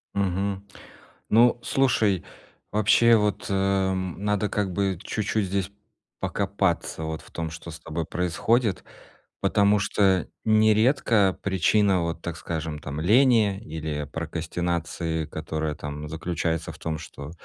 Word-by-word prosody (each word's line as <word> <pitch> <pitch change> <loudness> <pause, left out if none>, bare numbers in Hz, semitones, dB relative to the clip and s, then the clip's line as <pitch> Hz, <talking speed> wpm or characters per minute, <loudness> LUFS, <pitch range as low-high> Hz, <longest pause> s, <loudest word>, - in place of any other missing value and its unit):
Мгм. 100 0 -1 0.6
Ну, 120 +2 +5
слушай, 110 -8 +2 0.5
вообще 110 +3 +5
вот, 105 -2 0
э, 95 -1 +1
надо 100 +3 -1
как 100 -3 -1
бы 95 -1 0
чуть-чуть 110 -1 -1
здесь 95 +1 -2 0.5
покопаться 100 -5 -1
вот 80 0 -4
в - - -18
том, 80 -1 -4
что 80 +1 -9
с 80 - -9
тобой 80 +1 -4
происходит, 95 +6 0 0.6
потому 105 0 +3
что 95 -3 +2 0.2
нередко 110 -2 +3
причина 95 -1 +2
вот, 85 0 -3
так 85 -1 -4
скажем, 80 0 -4
там 70 +1 -5
лени 110 - +4
или 80 -3 -4
прокрастинации, 85 0 -2
которая 80 0 -3
там 75 +1 -6
заключается 80 0 -2
в - - -14
том, 80 -1 -3
что 75 -2 -9
95 Hz, 125 wpm, -25 LUFS, 80-105 Hz, 0.6 s, Ну